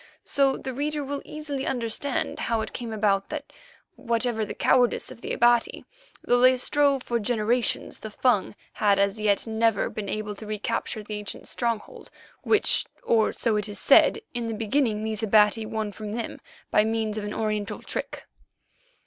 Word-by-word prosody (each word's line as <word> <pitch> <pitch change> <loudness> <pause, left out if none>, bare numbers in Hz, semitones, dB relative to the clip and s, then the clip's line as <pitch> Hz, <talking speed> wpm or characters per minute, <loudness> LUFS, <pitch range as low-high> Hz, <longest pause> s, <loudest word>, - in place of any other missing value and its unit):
So 275 -1 +2
the 260 - -5
reader 295 +2 -2
will 280 +1 -4
easily 295 -3 -5
understand 245 +2 -2
how 230 -1 0
it 220 - -6
came 235 -2 -5
about 205 -2 +1
that, 300 -1 -6 0.4
whatever 230 -2 -1
the 210 - -5
cowardice 245 -2 +2
of - - -12
the - - -5
Abati, 240 -1 +2 0.4
though 245 - +3
they 255 0 +6
strove 280 0 +2
for 235 -1 -1
generations, 230 +2 0
the 220 - -7
Fung 215 -2 +1 0.2
had 205 -2 +3
as 200 +2 +1
yet 205 -2 +2
never 225 -1 +1
been 205 -2 -5
able 215 -1 -3
to 215 - -8
recapture 215 +1 -3
the 210 0 -5
ancient 205 - -7
stronghold, 235 -3 -3 0.3
which, 430 0 +3 0.2
or 220 -2 +3
so 225 -3 0
it 210 0 -2
is 205 - -5
said, - - +5
in 240 -2 -2
the 225 - -3
beginning 220 0 0
these 220 -1 -3
Abati 215 0 +4
won 220 -2 -3
from 210 +1 -7
them 230 -1 -5 0.3
by 210 - +5
means 220 -1 -1
of - - -6
an 205 0 -4
Oriental 215 -2 -2
trick. - - -5
225 Hz, 175 wpm, -26 LUFS, 210-250 Hz, 0.4 s, they